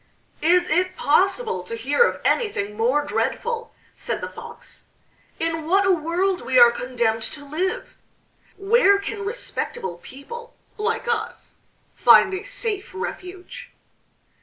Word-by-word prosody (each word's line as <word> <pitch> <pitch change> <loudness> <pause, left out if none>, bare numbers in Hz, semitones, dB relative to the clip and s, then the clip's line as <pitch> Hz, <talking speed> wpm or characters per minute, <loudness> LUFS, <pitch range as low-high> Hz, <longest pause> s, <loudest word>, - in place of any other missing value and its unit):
"Is 350 +2 +4
it 365 +3 +1
possible 380 - +2
to 180 +6 -6
hear 265 - 0
of 475 - +3
anything 210 - 0
more 255 +7 +1
dreadful?" 465 +9 -2 0.2
said - - -3
the - - -5
Fox. - - -11 0.5
"In 325 -1 -2
what 390 +3 +3
a 385 - +4
world 360 +3 0
we 260 - +1
are 240 -1 +9
condemned 235 -2 -1
to 285 +5 -6
live! 345 +6 -3 0.6
Where 400 0 +4
can 405 +1 -5
respectable 395 - -4
people 470 - -10 0.2
like 455 +2 -2
us 455 -1 -3 0.4
find 385 - +6
a 375 - -3
safe 455 -3 -4
refuge?" 365 0 -7
365 Hz, 130 wpm, -23 LUFS, 280-420 Hz, 0.6 s, are